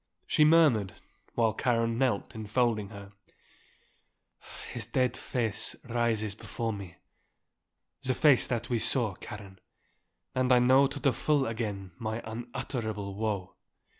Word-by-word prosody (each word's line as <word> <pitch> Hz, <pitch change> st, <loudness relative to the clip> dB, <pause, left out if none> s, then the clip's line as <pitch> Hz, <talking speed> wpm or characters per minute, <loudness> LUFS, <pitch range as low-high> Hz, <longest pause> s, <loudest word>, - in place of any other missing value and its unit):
She 155 Hz, -, +3 dB
murmured, 150 Hz, -, +4 dB, 0.4 s
while 115 Hz, -2 st, +3 dB
Karen 115 Hz, -1 st, +1 dB
knelt 125 Hz, -7 st, 0 dB
enfolding 110 Hz, -1 st, 0 dB
her, 100 Hz, -2 st, -10 dB, 1.6 s
"His 115 Hz, -3 st, -4 dB
dead 125 Hz, +1 st, +1 dB
face 115 Hz, -4 st, -1 dB
rises 115 Hz, -3 st, 0 dB
before 115 Hz, +2 st, -4 dB
me. 100 Hz, -4 st, -8 dB, 1.1 s
The 130 Hz, -1 st, -1 dB
face 145 Hz, -2 st, +5 dB
that 120 Hz, -3 st, -2 dB
we 120 Hz, -2 st, 0 dB
saw, 115 Hz, -2 st, +2 dB
Karen. 95 Hz, -1 st, -10 dB, 0.7 s
And 130 Hz, 0 st, +1 dB
I 125 Hz, -, +7 dB
know 130 Hz, +3 st, +5 dB
to 140 Hz, +1 st, -6 dB
the 140 Hz, -2 st, +2 dB
full 145 Hz, +1 st, +1 dB
again 105 Hz, -5 st, -4 dB
my 110 Hz, 0 st, -3 dB
unutterable 110 Hz, -3 st, -4 dB
woe." 100 Hz, -3 st, -2 dB
115 Hz, 125 wpm, -29 LUFS, 105-125 Hz, 1.6 s, I